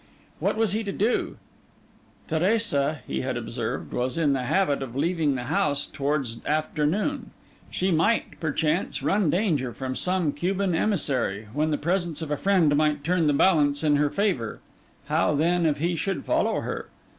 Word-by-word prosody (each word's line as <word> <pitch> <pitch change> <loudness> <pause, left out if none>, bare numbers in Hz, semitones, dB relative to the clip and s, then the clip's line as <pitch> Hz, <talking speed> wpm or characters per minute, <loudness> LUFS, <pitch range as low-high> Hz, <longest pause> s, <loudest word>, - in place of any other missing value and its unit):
What - - 0
was 220 -3 +2
he 220 +1 0
to 200 - -2
do? 215 +5 0 0.9
Teresa, 160 - +1
he 65 -1 -3
had - - -2
observed, - - -4
was 125 +5 -1
in 150 -4 +2
the 130 -2 -1
habit 145 -1 +1
of 130 -3 -6
leaving 155 -1 +1
the 125 - -3
house 145 +3 0
towards 140 -5 -2
afternoon: 155 - -1 0.4
she 185 +1 -1
might, 170 +8 +1
perchance, 155 +2 -1
run 195 -4 +2
danger 155 - +1
from 130 -1 -4
some 180 -3 0
Cuban 185 +5 -1
emissary, 130 - 0
when 155 +3 +1
the 150 - 0
presence 170 -1 -1
of 150 - -6
a - - +2
friend 175 -5 +3
might 150 -1 +1
turn 170 0 +1
the 145 - +3
balance 145 -3 +3
in 150 -2 +3
her 145 0 +2
favour: 185 - -1 0.5
how, 150 - +1
then, 170 +3 +2
if 150 -1 +1
he 170 +4 0
should 195 +4 -2
follow - - +1
her? - - -5
155 Hz, 170 wpm, -25 LUFS, 145-185 Hz, 0.9 s, friend